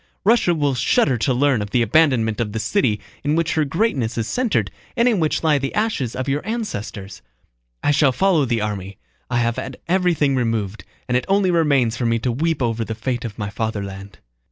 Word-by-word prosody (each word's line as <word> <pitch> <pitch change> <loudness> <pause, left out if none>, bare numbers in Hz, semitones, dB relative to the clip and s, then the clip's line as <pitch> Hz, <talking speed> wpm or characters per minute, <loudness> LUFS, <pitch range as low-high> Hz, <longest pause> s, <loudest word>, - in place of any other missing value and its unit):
Russia 210 -5 +3
will 145 -3 +1
shudder 130 +1 +2
to 120 +4 0
learn 130 -2 +2
of 105 - -4
the 120 +3 +2
abandonment 115 -4 +2
of 105 -3 -3
the 110 - -2
city 110 - +1 0.2
in 145 +2 +1
which 165 0 +1
her 155 - +2
greatness 140 - -1
is 115 -1 -1
centered 245 -4 0 0.3
and 235 +1 +4
in 225 -6 +2
which 155 0 0
lie 150 -3 +3
the 135 0 -4
ashes 210 - -1
of 130 +1 -3
your 140 +2 -1
ancestors! 110 - -5 0.6
I - - +3
shall 145 -2 +4
follow 170 0 +2
the 120 -3 0
army. 100 -2 -4 0.3
I 120 - 0
have 115 -1 0
had 130 0 -5
everything 170 -6 +2
removed, 115 -4 -2 0.2
and 125 - 0
it 125 - +1
only 195 -1 +3
remains 140 -9 +2
for 120 - 0
me 115 0 +2
to 120 +2 -1
weep 155 +3 0
over 115 -1 0
the 110 0 -5
fate 120 +1 -3
of 110 -3 -7
my 100 -2 -4
fatherland. 100 -4 -5
130 Hz, 205 wpm, -21 LUFS, 110-160 Hz, 0.6 s, and